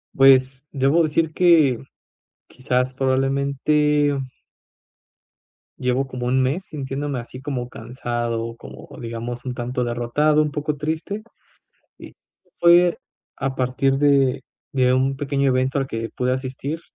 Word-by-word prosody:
Pues, 135 0 +5
debo 140 +4 +2
decir 160 0 +1
que, 160 -9 +4 0.7
quizás, 125 0 -1
probablemente 140 +2 +1 1.6
llevo 130 +1 0
como 125 -1 -4
1 130 +1 +2
mes 145 +9 -1
sintiéndome 140 -1 -4
así 125 +2 -9
como 130 -3 -3
cansado, 120 -1 -4
como - - -11
digamos 120 +1 -5
un 125 - -3
tanto 125 +1 -3
derrotado, 120 +6 +1
un 150 - -3
poco 150 0 -3
triste. 160 +8 -3 0.8
Y - - -12 0.4
fue 175 0 +5 0.4
a 135 -1 -3
partir 130 +1 +1
de 140 -2 +3 0.3
de 125 -1 +3
un 135 +1 +1
pequeño 140 0 0
evento 130 +1 +1
al 135 - -2
que 115 -2 -4
pude 125 -1 -1
asistir, 130 +4 -4
135 Hz, 125 wpm, -22 LUFS, 125-145 Hz, 1.6 s, Pues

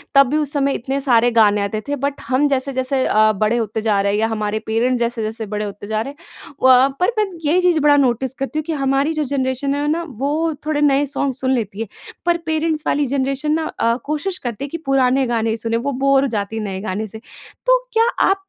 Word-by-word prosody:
तब 275 -1 +7
भी 300 - +1
उस 295 -2 -1
समय 280 -1 +1
इतने 270 +3 -2
सारे 245 -3 +3
गाने 210 -3 +4
आते 200 +2 -2
थे 285 - -1
बट 280 +1 -3
हम 265 +4 +2
जैसे-जैसे 260 -1 -1
अ, 215 0 +4
बड़े 215 +3 0
होते 220 -1 -2
जा 215 -2 +1
रहे 200 0 +1
हैं 205 - 0
या 220 - +2
हमारे 215 -1 -2
पेरेंट्स 240 +3 +1
जैसे-जैसे 225 -1 -2
बड़े 210 0 -3
होते 205 0 -8
जा 215 0 -1
रहे 275 +5 -5
हैं, - - -29 0.5
वहाँ 260 +1 +6
पर 360 - +3
मैं 425 - +3 0.2
ये 320 +5 +3
चीज़ 355 -3 +3
बड़ा 290 -1 +5
नोटिस 260 -1 +1
करती 275 +3 -3
हूँ - - -3
कि 330 - -2
हमारी 275 +3 +1
जो 310 -1 -1
जनरेशन 265 +1 -1
है 290 +1 -1
ना 335 +2 -1 0.2
वो 310 +4 0
थोड़े 305 -1 0
नए 285 -1 +3
सॉन्ग 280 -1 -1
सुन 260 +1 -2
लेती 215 -5 -3
है। 225 - -3 0.4
पर 345 -1 +3
पेरेंट्स 315 -1 -1
वाली 290 0 +2
जनरेशन 275 +2 -1
ना 320 +1 0
अ, 230 0 +2
कोशिश 315 +6 -2
करती 235 +2 -4
है - - -8
कि 335 - -4
पुराने 270 -1 +2
गाने 225 -2 0
सुने, 230 +1 -1
वो 270 +5 -2
बोर 275 +1 +3
हो 275 - +1
जाती 220 -2 -3
है 220 - -3
नए 195 -2 -4
गाने 210 +1 -3
से। 220 +2 -9 0.5
तो - - +5 0.2
क्या 455 +1 +4 0.2
आप 390 - +4
265 Hz, 235 wpm, -19 LUFS, 225-290 Hz, 0.5 s, तब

